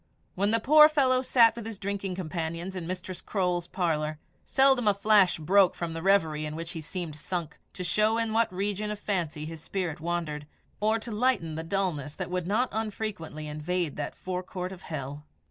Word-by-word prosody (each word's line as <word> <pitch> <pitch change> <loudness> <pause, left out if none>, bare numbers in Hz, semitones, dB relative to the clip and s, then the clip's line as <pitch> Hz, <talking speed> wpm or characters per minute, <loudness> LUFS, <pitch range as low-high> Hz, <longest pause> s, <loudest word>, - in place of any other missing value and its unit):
When 200 +2 +1
the 230 +1 +3
poor 300 +6 +8
fellow 260 -4 +3
sat 235 -3 +5
with 235 - -6
his 225 -2 -6
drinking 195 -1 -3
companions 170 +1 -4
in 175 -3 -4
Mistress 185 0 -5
Croale's 180 -3 -1
parlour, 155 -4 -1 0.3
seldom 265 -4 +4
a 205 - +5
flash 200 -2 +4
broke 185 +4 +4
from 170 -1 -4
the 165 - -4
reverie 165 -5 +3
in 150 - -5
which 165 +1 -5
he 165 - -5
seemed 165 -1 -5
sunk, 170 0 -4
to 180 - -5
show 215 +5 +2
in 225 -1 0
what 230 -2 +2
region 205 +2 -2
of 210 - -3
fancy 170 -7 -2
his 160 0 -7
spirit 175 -3 -3
wandered, 160 -3 -3 0.3
or 215 +2 +2
to 225 +1 -7
lighten 215 -8 +1
the 160 - -3
dulness 165 -5 -2
that - - -5
would 180 -1 -2
not 230 +6 +1
unfrequently 205 -8 -4
invade 155 +1 -2
that 150 - -4
forecourt 185 0 -4
of 190 -1 -9
hell. 145 -3 -6
185 Hz, 190 wpm, -28 LUFS, 165-210 Hz, 0.3 s, poor